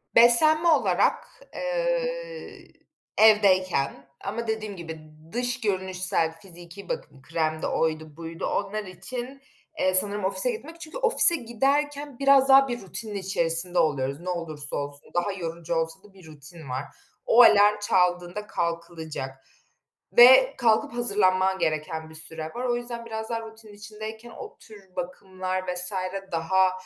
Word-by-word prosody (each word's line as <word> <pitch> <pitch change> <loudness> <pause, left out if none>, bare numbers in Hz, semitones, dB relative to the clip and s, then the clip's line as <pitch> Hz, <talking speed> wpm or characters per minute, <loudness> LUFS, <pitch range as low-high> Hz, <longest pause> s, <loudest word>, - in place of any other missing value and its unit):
Beslenme 310 +8 +5
olarak, 325 +8 +2 0.3
eee, - - -3 0.5
evdeyken 185 -10 +3
ama 225 +4 -4
dediğim 215 -2 -3
gibi, 160 -3 -8 0.3
dış 245 +2 -2
görünüşsel, 185 -5 -1
fiziki 175 +1 -12
bakım 135 - -6
kremdi 155 +1 -2
oydu 155 -1 -2
buydu, 165 0 -6
onlar 205 +2 -2
için, 245 +9 -7 0.4
eee, 185 - +2
sanırım 205 +1 +5
ofise 200 - +1
gitmek. 335 -6 -9
Çünkü 320 +6 -8
ofise 470 -8 +5
giderken 280 +2 -1
biraz 275 -1 +5
daha 270 0 +7
bir 240 -1 -4
rutinin 210 +3 -6
içerisinde 175 -2 0
oluyoruz, 140 -3 0
ne 180 +2 -6
olursa 155 -5 -4
olsun. 145 0 -6
Daha 175 +4 0
yorucu 170 -2 -5
olsa 165 +4 -3
da 205 -2 -19
bir 190 -3 -17
rutin 150 0 -12
var. 130 +2 -3 0.4
O 240 - +6
alarm 210 -1 +6
çaldığında 180 0 0
kalkılacak 160 -5 -5 0.7
ve 260 +2 +8
kalkıp 230 -2 +2
hazırlanman 190 -5 +1
gereken 160 0 -2
bir 160 - -10
süre 160 0 -4
var. 250 - -3
O 240 -1 +1
yüzden 240 -1 -6
biraz 220 -1 -6
daha 230 -1 -2
rutinin 220 -1 -13
içindeyken 215 +3 -9
o - - -10
tür 200 -4 -16
bakımlar 185 +1 -4
vs. 180 +2 -2 0.4
daha, 185 +3 +2
195 Hz, 135 wpm, -25 LUFS, 170-240 Hz, 0.7 s, ve